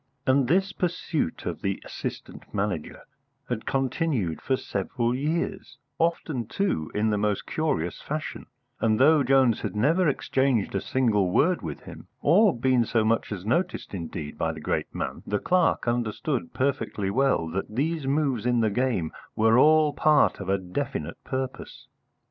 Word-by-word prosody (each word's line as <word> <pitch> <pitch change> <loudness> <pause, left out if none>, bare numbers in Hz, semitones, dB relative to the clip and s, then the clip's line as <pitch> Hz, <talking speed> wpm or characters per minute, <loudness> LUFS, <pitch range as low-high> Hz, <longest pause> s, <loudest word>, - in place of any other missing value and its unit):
And 130 -1 +3
this 190 +6 +2
pursuit 170 - -2
of - - -4
the 100 -1 -1
Assistant - - -7
Manager 100 -6 -3 0.5
had 110 - -3
continued 130 - -1
for 130 - 0
several 115 +4 -2
years, 150 +6 -2 0.2
often, 160 -7 0
too, 150 - -1
in 110 +1 +2
the 105 - 0
most 105 -1 0
curious 90 - -2
fashion; 155 +1 -5 0.3
and 110 -1 +2
though 150 +3 +6
Jones 130 -3 +3
had - - -4
never 160 - +3
exchanged 130 -5 +1
a 95 - 0
single 110 -8 +1
word 175 - +2
with 80 -4 -6
him, - - -11
or 200 - +4
been 125 0 +3
so 110 -1 +1
much 115 0 +1
as 95 -2 -5
noticed 170 - -1
indeed 85 -4 -6
by - - +1
the - - -8
great - - -1
man, - - -4
the 105 - 0
clerk 180 - +1
understood 120 +3 -1
perfectly 110 -7 -1
well 130 -7 +2
that 95 +5 -4
these 155 +2 -1
moves 135 -5 0
in 120 -1 +2
the 110 -2 +2
game 115 -8 0 0.2
were 110 +2 +4
all 155 0 +5
part 155 -1 +3
of 95 -2 -5
a 100 - +3
definite 90 - -4
purpose. 130 0 -5
125 Hz, 160 wpm, -26 LUFS, 105-150 Hz, 0.5 s, though